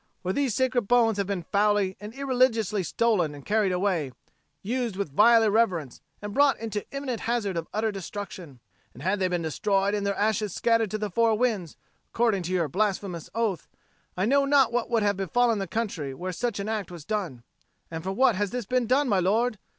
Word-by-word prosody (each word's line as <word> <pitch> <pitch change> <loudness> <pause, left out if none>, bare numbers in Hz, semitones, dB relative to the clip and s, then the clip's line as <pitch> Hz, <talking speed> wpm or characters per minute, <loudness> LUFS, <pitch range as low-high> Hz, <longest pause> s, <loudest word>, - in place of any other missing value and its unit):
For 185 +1 -1
these 270 -4 0
sacred 250 -4 +1
bones 230 -3 +3
have 200 - -1
been 190 -4 -3
foully 205 -2 +2
and 210 +2 -8
irreligiously 250 -7 +1
stolen 180 -6 +1
and 140 - -12
carried 210 -2 +1
away, 180 -7 0 0.5
used 235 -1 -2
with 190 -8 -4
vile 230 +3 +6
irreverence 200 - +1 0.2
and 205 0 -5
brought 280 -1 +4
into 215 -2 -5
imminent 275 -4 -4
hazard 225 -5 -1
of 165 -1 -3
utter 220 +1 0
destruction: 185 - -8 0.3
and 125 - -11
had 190 +3 0
they 185 - +2
been 175 -2 -2
destroyed 195 +5 0
and 205 -1 -1
their 200 0 0
ashes 210 -2 0
scattered 230 -2 +2
to 215 - -2
the 210 -1 -4
four 230 +1 +2
winds, 215 -9 -1 0.3
according 225 -5 +1
to 175 +1 -5
your 175 -3 +1
blasphemous 190 -3 -2
oath, 225 -6 -1 0.5
I 185 - +1
know 280 +5 +3
not 275 -3 +4
what 240 -1 -1
would 230 -3 +1
have 205 -1 +1
befallen 225 +4 +1
the 195 - -3
country 175 -12 -3
where 185 +5 -4
such 225 +3 -3
an 200 - -3
act 215 -4 -3
was 170 -4 -10
done. 180 - -3 0.5
And 160 -1 -5
for 190 - -2
what 245 +4 +3
has 205 0 -1
this 245 0 -4
been 250 +2 0
done, 270 +4 +2
my 200 -5 +2
lord? 215 +4 +1
205 Hz, 205 wpm, -26 LUFS, 185-230 Hz, 0.5 s, vile